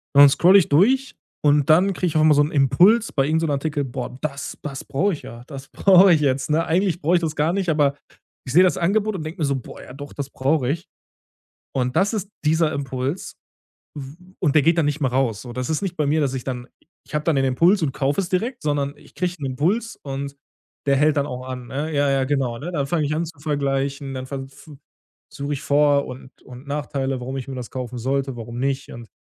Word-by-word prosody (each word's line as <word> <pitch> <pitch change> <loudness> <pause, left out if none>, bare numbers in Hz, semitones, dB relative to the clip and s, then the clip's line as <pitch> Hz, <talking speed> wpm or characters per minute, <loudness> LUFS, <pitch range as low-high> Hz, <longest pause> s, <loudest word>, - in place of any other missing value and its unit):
Und 140 - +9
dann 145 - +10
scrolle 185 +7 +6
ich 170 - -1
durch 255 - +3 0.3
und 145 -1 +3
dann 180 +6 +5
kriege 180 - -1
ich 160 - -3
auch 155 - +4
mal 155 - +6
so 145 - +4
'n 150 - -2
Impuls 175 - +4
bei 135 - +1
irgend 160 +3 +1
so 165 - 0
'nem 150 - -1
Artikel: 145 +1 -1
„Boah, 125 -1 -6
das 140 -2 -4
das 140 -3 -6
brauche 190 +9 0
ich 155 - -6
ja. 120 +1 -10
Das 135 -2 -9
brauche 190 -1 +6
ich 155 - +2
jetzt“, 135 -1 0
ne? 160 +2 +2
Eigentlich 180 +1 0
brauche 170 +4 +2
ich 175 - +2
das 160 -2 -2
gar 155 +3 +1
nicht, 190 -1 -1
aber 145 -3 +2 0.5
ich 130 - -5
sehe 180 - +7
das 185 - +2
Angebot 205 +4 +1
und 160 - -4
denke 165 +3 -7
mir 150 - +2
so: 140 - 0
„Boah, 125 - -10
ja, - - -12
doch, 145 +1 -9
das 140 -1 -5
brauche 135 -1 0
ich.“ 165 +4 -3 0.9
Und 125 -1 -1
das 200 +4 +2
ist 205 -2 -3 0.2
dieser 160 0 +3
Impuls 135 +3 -4 0.6
w 140 +1 -8 0.2
und 150 -5 +1
der 155 - +6
geht 165 +4 +3
dann 165 - +3
nicht 145 +1 -1
mehr 130 - +2
raus. 125 -5 0
So 120 - -9
das 125 +1 -4
ist 160 +2 -1
nicht 185 -3 -4
bei 150 - +1
mir, 155 +2 +2
dass 135 -3 0
ich 130 -2 -4
dann 125 -2 -4 0.2
i - - -45 0.2
ich - - -16
habe 150 - -1
dann 165 - +2
den 135 - +2
Impuls 170 +9 +3
und 145 - 0
kaufe 140 +6 0
es 180 - -5
direkt, 235 +7 -2
sondern 145 -1 -1
ich - - -20
kriege 180 -1 -1
'n 140 - -4
Impuls 180 - -1
und 140 0 -5 0.5
der 140 - +4
hält 150 +2 +3
dann 140 - +2
auch 125 0 -6
an, 125 -1 -6
ne? 145 +5 -3
Ja, 145 -1 +2
ja, 135 -1 +2
genau, 130 -4 -1
ne? 170 +5 -5
Dann 140 -5 -1
fange 160 -2 0
ich 145 - -1
an 170 - -1
zu 165 -2 -12
vergleichen, 140 -2 -2
dann 130 0 -6
ver 135 0 -5
v 145 +1 -15 0.6
suche 145 0 -3
ich 140 - -5
Vor 145 -1 +3
und 130 +1 -11
und 125 +2 -12
Nachteile, 140 -2 -2
warum 130 +2 -5
ich 130 - -6
mir 135 - -5
das 125 -2 -6
kaufen 125 -1 -5
sollte, 135 +2 -1
warum 120 +1 -7
nicht. 135 0 -2
Und 120 -1 -10
145 Hz, 255 wpm, -22 LUFS, 135-165 Hz, 0.9 s, dann